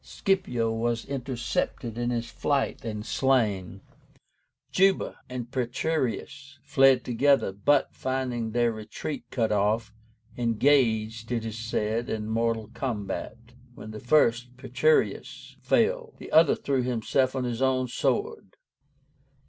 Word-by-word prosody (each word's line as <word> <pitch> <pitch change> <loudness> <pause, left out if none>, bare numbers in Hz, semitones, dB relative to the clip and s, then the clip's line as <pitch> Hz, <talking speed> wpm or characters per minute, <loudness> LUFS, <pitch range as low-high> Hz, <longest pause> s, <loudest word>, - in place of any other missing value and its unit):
Scipio 125 -13 0
was 115 +1 -1
intercepted 125 -3 -3
in 120 0 -1
his 120 -1 -2
flight 140 -2 -1
and 105 -2 -5
slain. 105 -8 0 0.9
Juba 195 +1 +2
and 125 -1 -6
Petreius 135 +1 -2
fled 135 -2 +4
together, 135 -1 +2
but, 135 +9 +2
finding 130 -3 -2
their 120 +1 +1
retreat 110 +6 -6
cut 115 -4 0
off, 105 +2 +1 0.4
engaged, 115 -2 +1
it 115 -2 -1
is 110 0 -5
said, 115 0 -2
in 105 -1 -3
mortal 115 -1 -1
combat; 110 -5 -4 0.4
when 110 - -9
the 110 - -7
first, 125 -2 +2
Petreius, 130 +5 0
fell, 480 -2 +1
the - - -10
other 160 -1 +6
threw 135 -2 -1
himself 125 +2 0
on 130 - -1
his 120 0 -3
own 130 -1 +2
sword. 440 - -2
120 Hz, 120 wpm, -27 LUFS, 115-135 Hz, 0.9 s, other